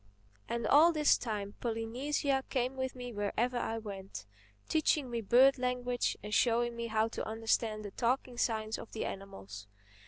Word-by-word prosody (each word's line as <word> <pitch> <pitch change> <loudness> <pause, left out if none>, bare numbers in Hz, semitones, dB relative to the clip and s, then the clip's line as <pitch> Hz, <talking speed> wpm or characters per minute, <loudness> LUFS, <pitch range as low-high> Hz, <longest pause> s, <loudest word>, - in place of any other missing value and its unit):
And 235 0 -2
all 315 +5 +7
this 305 -2 +4
time 205 -3 -4
Polynesia 260 +4 -1
came 255 0 -1
with 260 0 -3
me 245 -1 -7
wherever 220 +4 -1
I 225 -1 -2
went, 195 - -7 0.4
teaching 300 -4 +1
me 235 -1 -1
bird 255 +6 +5
language 250 -1 -1
and 210 0 -6
showing 240 +1 +2
me 235 0 -3
how 220 0 +1
to - - -5
understand 220 -1 0
the 205 - -6
talking 245 +2 -1
signs 220 -2 0
of - - -10
the 220 - -3
animals. 105 - -8
235 Hz, 160 wpm, -32 LUFS, 215-250 Hz, 0.4 s, all